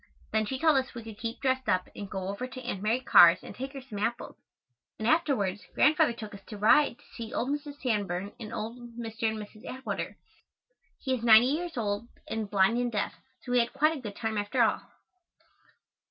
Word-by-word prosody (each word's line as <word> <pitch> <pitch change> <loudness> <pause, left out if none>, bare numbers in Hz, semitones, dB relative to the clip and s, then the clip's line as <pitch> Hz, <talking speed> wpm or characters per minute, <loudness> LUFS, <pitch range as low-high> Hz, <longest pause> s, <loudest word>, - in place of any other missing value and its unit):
Then 220 -1 +1
she 265 - -2
told 310 0 +4
us 260 -2 -2
we 235 - -6
could 220 -2 -10
keep 230 0 -5
dressed 260 -1 0
up 185 0 +2
and 200 -1 -7
go 190 -1 -4
over 200 +6 -4
to 255 0 -9
Aunt 205 -6 -4
Mary 225 +5 +1
Carr's 175 -6 +7
and - - -9
take 270 +2 -6
her 275 - -7
some 250 -6 -8
apples, 230 +3 -2 0.6
and 220 - -2
afterwards 235 - +1
Grandfather 305 -2 +4
took 215 -3 -8
us 200 -1 -11
to 210 - -7
ride 235 +5 +4
to - - -23
see 230 -2 -7
old 250 - -1
Mrs. 290 0 -4
Sanborn 200 -5 -1
and 220 -2 -7
old 225 +2 -5 0.2
Mr. 225 -1 -2
and 220 - -4
Mrs. 215 +1 -10
Atwater. 260 0 -5 0.8
He 265 - -2
is 245 -3 -2
ninety 230 +2 +7
years 330 +1 -2
old 210 0 -1 0.2
and 220 -2 -3
blind 200 +4 +3
and 245 -1 0
deaf, 210 - -1 0.3
so 250 - -6
we 245 - +4
had 235 0 0
quite 305 +4 +3
a 280 - -7
good 210 -4 -7
time 220 -1 -2
after 205 +4 +2
all. 220 - +2
230 Hz, 210 wpm, -29 LUFS, 210-260 Hz, 0.8 s, Carr's